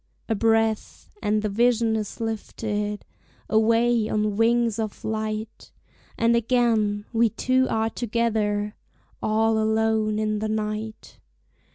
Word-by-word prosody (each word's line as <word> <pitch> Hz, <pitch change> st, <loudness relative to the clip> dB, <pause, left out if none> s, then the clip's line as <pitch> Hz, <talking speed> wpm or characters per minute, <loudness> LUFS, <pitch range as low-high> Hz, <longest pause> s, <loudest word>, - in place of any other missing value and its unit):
A 225 Hz, -, +1 dB
breath, 225 Hz, 0 st, 0 dB
and 210 Hz, 0 st, 0 dB
the -, -, +1 dB
vision 230 Hz, +1 st, +2 dB
is 215 Hz, -2 st, -4 dB
lifted 210 Hz, -2 st, -3 dB, 0.4 s
Away 230 Hz, +1 st, +2 dB
on 210 Hz, -1 st, 0 dB
wings 230 Hz, 0 st, +2 dB
of 215 Hz, -2 st, -4 dB
light, 215 Hz, 0 st, -4 dB, 0.5 s
And 230 Hz, +1 st, +3 dB
again 225 Hz, -3 st, +1 dB
we 230 Hz, 0 st, +3 dB
two 260 Hz, +3 st, +1 dB
are 225 Hz, 0 st, 0 dB
together, 215 Hz, -3 st, -1 dB, 0.5 s
All 220 Hz, +1 st, +2 dB
alone 220 Hz, 0 st, +1 dB
in 215 Hz, -1 st, 0 dB
the 215 Hz, 0 st, -2 dB
night. 215 Hz, 0 st, -4 dB
220 Hz, 120 wpm, -24 LUFS, 215-230 Hz, 0.5 s, And